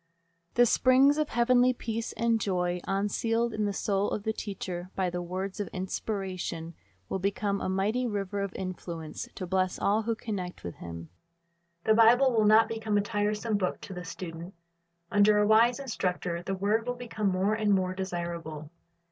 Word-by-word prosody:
The 245 - +6
springs 265 +5 +5
of 305 - 0
heavenly 250 +1 +4
peace 230 -1 -4
and 230 -1 +1
joy, 180 -2 0
unsealed 225 +4 0
in 215 -1 0
the 205 - 0
soul 200 0 0
of 205 - -3
the 220 0 0
teacher 185 -4 -5
by 185 -2 0
the 175 0 -3
words 185 +3 -4
of 205 - -2
Inspiration, 185 -3 -4 0.3
will 190 - -2
become 200 +1 -1
a - - -1
mighty 210 +7 0
river 200 -2 -2
of 200 -1 -2
influence 170 -4 -6
to 185 - -4
bless 185 0 0
all 210 +2 +2
who 225 +1 -1
connect 195 -5 -5
with 85 - -6
him. 85 -1 -8 0.7
The 220 - +2
Rible 235 +4 +6
will 215 -1 +4
not 220 +2 +6
become 220 -2 -1
a - - +4
tiresome 210 +1 -1
book 185 -2 -1
to 195 - -8
the 180 -1 -6
student. 170 +1 -7 0.6
Under 205 +1 +5
a 210 - +4
wise 230 +4 +5
instructor 180 -9 -2
the 195 +2 -3
word 210 +5 0
will 245 - -1
become 225 -4 -2
more 190 +3 +1
and 215 -1 0
more 185 -2 +2
desirable. 170 -5 -5
200 Hz, 175 wpm, -29 LUFS, 185-225 Hz, 0.7 s, The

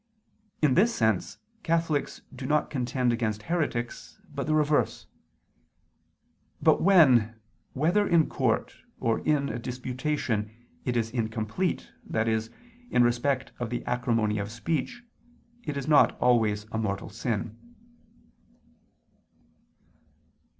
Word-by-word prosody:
In 145 -4 +5
this 230 - +3
sense 110 -5 0 0.2
Catholics 165 -5 -1
do 130 0 -6
not 150 +1 +1
contend 125 -2 0
against 110 -3 -2
heretics, 145 -9 -3
but - - -3
the 155 - +2
reverse. 150 -1 +1 1.5
But - - +4
when, 130 - +5 0.4
whether 175 +9 +2
in 170 -3 +4
court - - 0 0.2
or 115 -1 +1
in 145 -2 +1
a 120 - -4
disputation, 125 -2 -2 0.4
it 125 -1 0
is 115 -1 -1
incomplete, 110 - -2 0.2
i.e. 110 0 +1 0.5
in 125 - +4
respect 125 +3 0
of 120 -2 -3
the 120 - -4
acrimony 115 -4 0
of 100 0 -3
speech, 160 - -3 0.6
it 150 -3 -3
is 140 0 -4
not 150 -2 +5
always 110 -4 +2
a 110 - -2
mortal 100 -3 -2
sin. 110 0 -3
125 Hz, 115 wpm, -27 LUFS, 110-150 Hz, 1.5 s, In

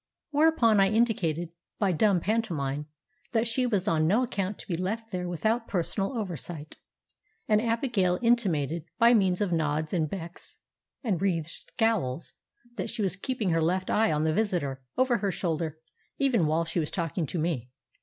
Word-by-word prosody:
Whereupon 290 -8 +4
I 195 - +6
indicated, 190 -8 +1 0.3
by 200 -3 +2
dumb 185 +1 +3
pantomime, 150 -10 -1 0.5
that 225 0 +2
she 250 +2 +1
was 205 -4 0
on 155 -4 +2
no 215 +9 +3
account 200 -4 -2
to - - -10
be 180 - -2
left 215 +6 -3
there 180 -2 -3
without 220 +8 0
personal 195 +5 -1
oversight; 170 - -5 0.7
and 215 -1 +4
Abigail 230 -6 +1
intimated, 170 - +1
by 235 +1 +6
means 190 -4 +3
of 200 -3 +1
nods 155 -1 0
and 160 -4 +1
becks 170 -2 -7 0.5
and 205 -9 0
wreathèd 175 -5 +1 0.3
scowls, 190 - 0 0.4
that - - -2
she 215 - -2
was 185 -3 0
keeping 215 -1 -2
her 165 0 +2
left 185 +3 0
eye 220 +1 +3
on 150 0 +1
the 160 0 +2
visitor, 170 -10 0 0.2
over 255 -2 +3
her 200 0 0
shoulder, 160 -3 -2 0.4
even 245 - +2
while 160 +2 +1
she 165 +2 -1
was 155 - -1
talking 165 -2 -2
to 175 - -4
me. 155 -7 -1
185 Hz, 170 wpm, -28 LUFS, 165-225 Hz, 0.7 s, I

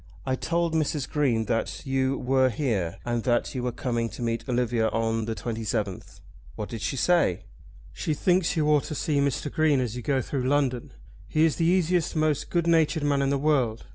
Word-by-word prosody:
"I 130 - 0
told 170 +4 -1
Mrs. 150 -3 0
Green 125 -7 +1
that 115 - -2
you 135 0 0
were 130 0 +2
here, 110 - -1
and 120 -1 -1
that 120 -2 +1
you 130 - -3
were 125 0 -1
coming 115 -1 -2
to 120 - -7
meet 115 0 -2
Olivia 120 -2 +1
on 115 0 -1
the 115 0 -3
27th." 110 -4 -4 0.3
"What 105 - -5
did 115 -3 -6
she - - -2
say?" 125 - +2 0.5
"She 155 - -2
thinks 180 +1 +1
you 150 -1 +2
ought 150 -2 +3
to 155 - -5
see 145 0 0
Mr. 140 +1 -1
Green 155 -3 +2
as 125 -3 -2
you 125 - -5
go 135 +3 0
through 130 0 -2
London. 135 -4 0 0.4
He 155 +1 +3
is 160 - +1
the 165 - +2
easiest, 175 -2 +1
most 155 -2 0
good 170 -1 0
natured 160 -2 +2
man 145 -1 +2
in 135 - +1
the 140 - +1
world. 135 -6 +1
135 Hz, 200 wpm, -26 LUFS, 115-155 Hz, 0.5 s, ought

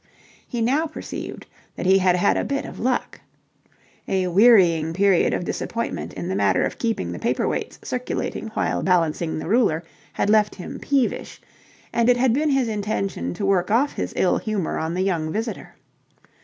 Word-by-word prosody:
He 240 -2 -3
now 280 +8 +2
perceived 310 - -7 0.3
that - - -5
he 190 +1 +5
had 185 -1 +3
had 190 +3 +2
a - - 0
bit 280 0 -2
of - - -9
luck. 250 +1 -1 0.9
A 190 -1 +1
wearying 180 -5 +5
period 195 0 +3
of 175 - -2
disappointment 230 +5 -3
in 175 - -5
the 190 - -2
matter 195 - +2
of - - -5
keeping 225 - -1
the 85 - -6
paper - - 0
weights - - -3
circulating - - -3
while 85 0 0
balancing 165 -2 +1
the 155 - -5
ruler, 200 -6 +2 0.3
had - - 0
left 210 0 +3
him 180 - -8
peevish, 275 -4 -1 0.5
and 235 +1 +2
it 245 - +5
had 245 -1 +3
been 300 +4 +1
his 270 -3 +2
intention 195 - -2
to - - -3
work 190 -2 +2
off 255 +7 +2
his - - -3
ill - - +2
humour 210 -6 -2
on 160 +2 -2
the 185 - 0
young 165 -5 -1
visitor. 225 +4 -4
200 Hz, 180 wpm, -23 LUFS, 175-235 Hz, 0.9 s, he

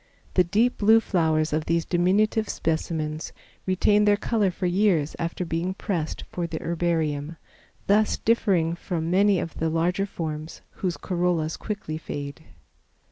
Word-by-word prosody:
The 180 - +5
deep 215 +8 +1
blue 220 +2 +6
flowers 160 -7 +1
of 155 0 0
these 165 0 +1
diminutive 205 +5 +2
specimens 155 -1 -2 0.3
retain 205 +3 +3
their 205 0 +4
color 210 -2 +1
for 180 +1 -4
years 175 -5 +2
after 170 +2 -2
being 170 +3 -2
pressed 170 -6 -3
for 175 -1 -2
the 160 -1 -4
herbarium, 160 -3 -1 0.5
thus 210 +2 +3
differing 190 -8 +2
from 170 -1 -3
many 200 0 +4
of 165 - -5
the 160 - +1
larger 175 +5 0
forms, 155 -3 -6
whose 180 -3 -2
corollas 175 -3 0
quickly 195 -7 -5
fade. 145 -1 -6
175 Hz, 140 wpm, -25 LUFS, 160-200 Hz, 0.5 s, blue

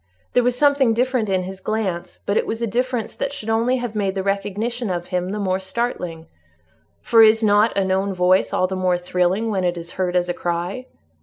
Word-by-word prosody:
There 250 - +4
was 245 0 0
something 280 -4 +3
different 250 -3 0
in 185 -1 +1
his 190 +1 -7
glance, 190 -4 -3
but 200 - 0
it - - +1
was 225 - -3
a 235 - 0
difference 245 0 -2
that 275 - -2
should 225 -6 -4
only 235 +3 +2
have 245 -3 -4
made 200 -3 -1
the 190 - -2
recognition 205 +4 -2
of 175 -1 -2
him 180 0 -2
the 205 - -3
more 190 -2 0
startling; 190 -5 -3 0.8
for 230 - +5
is 220 0 +6
not 210 +1 +3
a 195 - +2
known 190 +1 0
voice 185 0 +2
all 185 - +2
the 190 +1 -3
more 185 -1 +1
thrilling 180 +5 0
when 190 -3 -1
it 175 -1 0
is 170 0 -7
heard 180 -1 -2
as 180 0 +2
a 175 - -1
cry? 175 +10 -3
200 Hz, 220 wpm, -21 LUFS, 185-230 Hz, 0.8 s, is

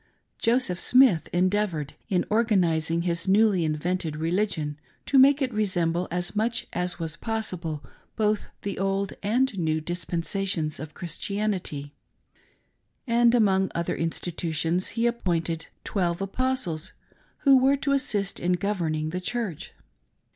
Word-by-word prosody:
Joseph 230 -6 +2
Smith 250 -10 +4
endeavored, 180 -5 0 0.2
in 185 -4 +1
organising 170 -7 +2
his 170 0 -1
newly 200 -2 +4
invented 160 +1 -1
religion, 160 -2 -1 0.3
to 275 - +4
make 280 +2 +6
it 255 -2 -2
resemble 180 -4 0
as 175 +2 -2
much 225 +2 0
as 180 0 -1
was 165 -2 -3
possible 185 -9 -4 0.3
both 215 -1 0 0.2
the 200 -2 -3
old 195 0 0
and 245 +4 +1
new 160 -2 +1
dispensations 170 0 -2
of 150 0 -8
Christianity, 175 -5 -2 1.1
and 235 -1 +4
among 190 -4 +3
other 170 0 -1
institutions 165 +1 -1
he 230 - +2
appointed 170 -8 -1 0.2
"Twelve 175 -4 -1
Apostles" 195 -5 -2 0.5
who 275 -2 +6
were 265 +2 +4
to 280 +1 -1
assist 210 -8 0
in 180 +1 +1
governing 170 -5 -1
the 180 +1 -3
Church. 215 -5 -3
185 Hz, 125 wpm, -26 LUFS, 165-215 Hz, 1.1 s, make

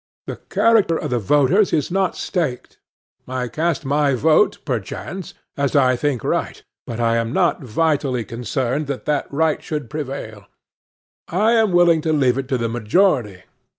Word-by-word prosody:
The - - -6
character 205 -5 +3
of 150 - -4
the 120 - +1
voters 145 - +3
is 150 0 0
not 190 0 0
staked. 155 -10 -3 0.5
I 130 -1 -3
cast 155 +4 -2
my 140 0 +2
vote, 155 - +3
perchance, 150 - -5 0.2
as 140 0 -1
I 130 -2 +4
think 135 -2 -1
right; - - -2 0.2
but 115 -1 -5
I 115 0 +2
am 115 0 -1
not - - +1
vitally 135 -1 0
concerned 125 +5 -2
that 140 -2 -5
that 150 -2 -1
right 155 +2 +1
should 150 -7 -5
prevail. 130 -9 -6 0.8
I 210 +6 +2
am 225 -3 +3
willing 175 -2 +4
to 155 0 0
leave 135 -3 +2
it 135 - -4
to 130 - 0
the 115 -1 -1
majority. 115 - +1
140 Hz, 160 wpm, -20 LUFS, 125-160 Hz, 0.8 s, I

